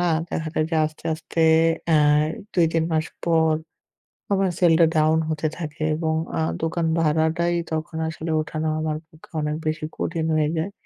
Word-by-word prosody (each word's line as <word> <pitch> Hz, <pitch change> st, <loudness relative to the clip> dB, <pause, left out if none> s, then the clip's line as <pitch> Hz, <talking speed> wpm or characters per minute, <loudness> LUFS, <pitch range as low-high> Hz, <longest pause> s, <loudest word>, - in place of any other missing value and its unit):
না 175 Hz, -, +2 dB, 0.2 s
দেখা 160 Hz, -1 st, -2 dB
যায় 155 Hz, -, +1 dB
যে 165 Hz, -, +1 dB
আস্তে, 155 Hz, 0 st, -6 dB
আস্তে 165 Hz, +1 st, -4 dB, 0.5 s
এ -, -, +6 dB, 0.6 s
২-৩ 165 Hz, -2 st, +2 dB
মাস 160 Hz, 0 st, +1 dB, 0.2 s
পর 160 Hz, -2 st, +3 dB, 0.8 s
আমার 195 Hz, -1 st, +2 dB
সেলটা 170 Hz, -2 st, +5 dB
ডাউন 155 Hz, +1 st, +4 dB
হতে 155 Hz, 0 st, -1 dB
থাকে 155 Hz, -2 st, -6 dB
এবং 160 Hz, 0 st, -1 dB, 0.3 s
আ -, -, +1 dB, 0.2 s
দোকান 165 Hz, +1 st, 0 dB
ভাড়াটাই 160 Hz, +2 st, +1 dB, 0.2 s
তখন 160 Hz, 0 st, -3 dB
আসলে 160 Hz, +1 st, -5 dB
উঠানো 155 Hz, +1 st, -3 dB
আমার 155 Hz, -1 st, -1 dB
পক্ষে 155 Hz, 0 st, -19 dB
অনেক 150 Hz, 0 st, -1 dB
বেশি 155 Hz, 0 st, -1 dB
কঠিন 165 Hz, -1 st, -2 dB
হয়ে 155 Hz, -1 st, +2 dB
যায়। 160 Hz, +5 st, -2 dB
160 Hz, 160 wpm, -23 LUFS, 155-165 Hz, 0.8 s, এ